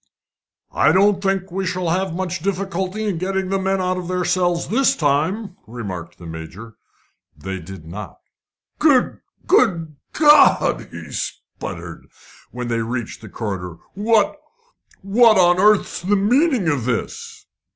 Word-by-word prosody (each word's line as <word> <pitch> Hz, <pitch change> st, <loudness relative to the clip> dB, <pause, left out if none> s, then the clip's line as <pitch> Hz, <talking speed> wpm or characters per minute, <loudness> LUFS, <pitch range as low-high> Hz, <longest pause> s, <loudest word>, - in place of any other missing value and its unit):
"I -, -, +4 dB
don't 195 Hz, +1 st, +3 dB
think 195 Hz, -1 st, -1 dB
we 195 Hz, +2 st, -2 dB
shall 185 Hz, -2 st, -2 dB
have 185 Hz, 0 st, -1 dB
much 180 Hz, -1 st, -3 dB
difficulty 190 Hz, +2 st, -3 dB
in 195 Hz, -6 st, -2 dB
getting 190 Hz, +1 st, -2 dB
the 195 Hz, 0 st, 0 dB
men 190 Hz, 0 st, 0 dB
out 185 Hz, 0 st, -1 dB
of 180 Hz, -1 st, -5 dB
their 180 Hz, 0 st, -1 dB
cells 175 Hz, -1 st, 0 dB
this 260 Hz, +4 st, +2 dB
time," 170 Hz, +8 st, 0 dB
remarked 100 Hz, -7 st, -7 dB
the 85 Hz, -, -12 dB
Major. 85 Hz, +8 st, -9 dB, 0.6 s
They 95 Hz, 0 st, -5 dB
did 90 Hz, 0 st, -11 dB
not. 95 Hz, +3 st, -8 dB, 0.6 s
"Good 285 Hz, -5 st, +3 dB, 0.3 s
good 170 Hz, -, +2 dB, 0.2 s
God!" 300 Hz, -1 st, +5 dB
he -, -, -10 dB
spluttered, -, -, -7 dB, 0.4 s
when 125 Hz, 0 st, -6 dB
they 115 Hz, -1 st, -1 dB
reached 115 Hz, 0 st, -4 dB
the 110 Hz, -, -10 dB
corridor; 95 Hz, -6 st, -5 dB, 0.2 s
"what 220 Hz, +7 st, +1 dB, 0.6 s
what 215 Hz, +2 st, +5 dB
on 175 Hz, -1 st, +4 dB
earth's 210 Hz, +1 st, +3 dB
the 195 Hz, +4 st, +1 dB
meaning 240 Hz, -, +2 dB
of 140 Hz, -7 st, 0 dB
this?" 125 Hz, -3 st, -4 dB
185 Hz, 140 wpm, -20 LUFS, 125-200 Hz, 0.6 s, God